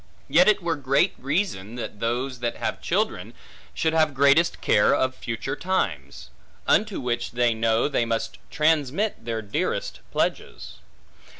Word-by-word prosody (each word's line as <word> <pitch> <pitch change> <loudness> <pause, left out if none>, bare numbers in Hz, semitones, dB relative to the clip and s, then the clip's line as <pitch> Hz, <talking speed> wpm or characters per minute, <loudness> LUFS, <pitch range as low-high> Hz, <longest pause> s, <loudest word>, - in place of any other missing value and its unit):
Yet 170 +6 +5
it 210 -3 +3
were 165 -3 -1
great 135 0 +2
reason 135 - -2
that 115 -3 -6
those 125 +3 -2
that 120 -1 -2
have - - -3
children, - - -2 0.4
should 160 0 0
have 155 -3 +2
greatest 140 +5 +4
care 105 - +3
of 130 0 0
future 130 +3 -4
times; 185 +4 -3 0.3
unto 210 -2 +2
which 120 -3 -2
they 120 -1 +2
know 115 +2 +1
they 120 -5 0
must 115 0 -3
transmit 155 - 0
their 115 -1 -3
dearest 100 - -2
pledges. - - -3
135 Hz, 140 wpm, -24 LUFS, 115-160 Hz, 0.4 s, Yet